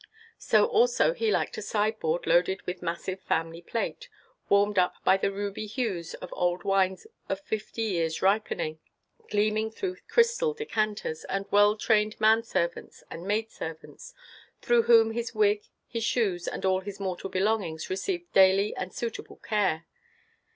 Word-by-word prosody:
So -, -, +4 dB
also 485 Hz, +2 st, +3 dB
he 460 Hz, -3 st, 0 dB
liked -, -, 0 dB
a -, -, -5 dB
sideboard 210 Hz, -6 st, -1 dB
loaded 175 Hz, +3 st, +2 dB
with 180 Hz, 0 st, -5 dB
massive 175 Hz, +3 st, -4 dB
family 165 Hz, +1 st, -2 dB
plate, 225 Hz, +6 st, -4 dB, 0.4 s
warmed 200 Hz, 0 st, +3 dB
up 180 Hz, -, +2 dB
with 190 Hz, 0 st, +4 dB
the -, -, +1 dB
ruby 205 Hz, +1 st, -4 dB
hues 205 Hz, -7 st, -3 dB
of -, -, -9 dB
old 175 Hz, 0 st, 0 dB
wines 190 Hz, -2 st, +1 dB, 0.2 s
of 195 Hz, -, -1 dB
fifty 220 Hz, +2 st, -4 dB
years' 170 Hz, -6 st, -1 dB
ripening, 190 Hz, -5 st, 0 dB, 0.5 s
gleaming 215 Hz, +1 st, +1 dB
through 365 Hz, -, -4 dB
crystal 470 Hz, 0 st, +2 dB
decanters, 215 Hz, -, -2 dB
and 195 Hz, 0 st, -2 dB
well 205 Hz, +1 st, +5 dB
trained 215 Hz, -1 st, +1 dB
man 220 Hz, +1 st, +5 dB
servants 170 Hz, -7 st, -3 dB
and 170 Hz, +3 st, -7 dB
maid 220 Hz, +2 st, 0 dB
servants, 160 Hz, -, -9 dB, 0.4 s
through 240 Hz, -1 st, +3 dB
whom 230 Hz, -1 st, +5 dB
his 235 Hz, 0 st, -4 dB
wig, 210 Hz, -1 st, +2 dB, 0.2 s
his 230 Hz, -1 st, -4 dB
shoes, 200 Hz, -7 st, 0 dB
and -, -, -3 dB
all 190 Hz, 0 st, +3 dB
his 200 Hz, +1 st, -8 dB
mortal 190 Hz, -1 st, -4 dB
belongings, 190 Hz, -5 st, -1 dB
received 350 Hz, -, -3 dB
daily 195 Hz, +2 st, +5 dB
and 185 Hz, 0 st, -5 dB
suitable 230 Hz, -2 st, -5 dB
care. 190 Hz, -7 st, -1 dB
205 Hz, 150 wpm, -28 LUFS, 185-225 Hz, 0.5 s, well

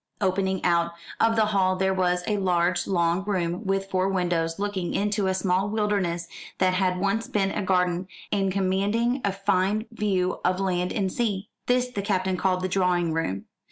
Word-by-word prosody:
Opening 190 Hz, -1 st, 0 dB
out 170 Hz, -1 st, +2 dB, 0.3 s
of 225 Hz, 0 st, +3 dB
the 220 Hz, -1 st, +4 dB
hall 190 Hz, -3 st, +2 dB
there 190 Hz, +1 st, +1 dB
was 180 Hz, -1 st, +1 dB
a 210 Hz, -, 0 dB
large 180 Hz, -2 st, +1 dB
long 170 Hz, 0 st, +1 dB
room 185 Hz, -1 st, -2 dB
with 195 Hz, 0 st, 0 dB
four 185 Hz, +1 st, +1 dB
windows 175 Hz, -3 st, 0 dB
looking 200 Hz, -3 st, -2 dB
into 205 Hz, -1 st, 0 dB
a 190 Hz, -, +1 dB
small 190 Hz, +1 st, +1 dB
wilderness 200 Hz, -6 st, 0 dB, 0.3 s
that 185 Hz, -1 st, +2 dB
had 185 Hz, -1 st, +1 dB
once 200 Hz, +4 st, 0 dB
been 195 Hz, -2 st, 0 dB
a -, -, -2 dB
garden, 180 Hz, -2 st, +1 dB, 0.2 s
and 195 Hz, -2 st, +1 dB
commanding 200 Hz, +7 st, +1 dB
a 200 Hz, -, +1 dB
fine 195 Hz, +2 st, 0 dB
view 195 Hz, -5 st, 0 dB
of 185 Hz, +1 st, +1 dB
land 180 Hz, -2 st, 0 dB
and 190 Hz, -3 st, -1 dB
sea. 210 Hz, -4 st, -2 dB, 0.2 s
This 250 Hz, 0 st, +2 dB
the 210 Hz, -5 st, -3 dB
Captain 190 Hz, -2 st, 0 dB
called 185 Hz, 0 st, 0 dB
the 185 Hz, -, 0 dB
drawing 180 Hz, -3 st, +1 dB
room. 100 Hz, -13 st, -2 dB
190 Hz, 180 wpm, -25 LUFS, 180-200 Hz, 0.3 s, the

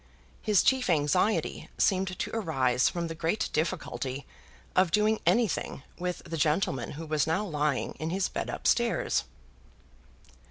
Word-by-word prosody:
His 210 Hz, -3 st, +3 dB
chief 260 Hz, -4 st, +2 dB
anxiety 170 Hz, +6 st, +1 dB
seemed 190 Hz, -1 st, +1 dB
to -, -, -3 dB
arise 135 Hz, -, +2 dB
from 170 Hz, -1 st, -3 dB
the 165 Hz, -, -4 dB
great 165 Hz, +6 st, -1 dB
difficulty 145 Hz, -4 st, -2 dB, 0.5 s
of 185 Hz, -1 st, +4 dB
doing 210 Hz, +4 st, +2 dB
anything 225 Hz, -, +1 dB, 0.2 s
with 180 Hz, 0 st, -3 dB
the 165 Hz, -, -4 dB
gentleman 150 Hz, -4 st, 0 dB
who 160 Hz, +3 st, -7 dB
was 155 Hz, -1 st, +1 dB
now 190 Hz, +7 st, +1 dB
lying 150 Hz, -6 st, 0 dB
in 160 Hz, -, -2 dB
his 185 Hz, +2 st, 0 dB
bed -, -, -4 dB
up -, -, -6 dB
stairs. -, -, +2 dB
165 Hz, 145 wpm, -29 LUFS, 150-195 Hz, 0.5 s, of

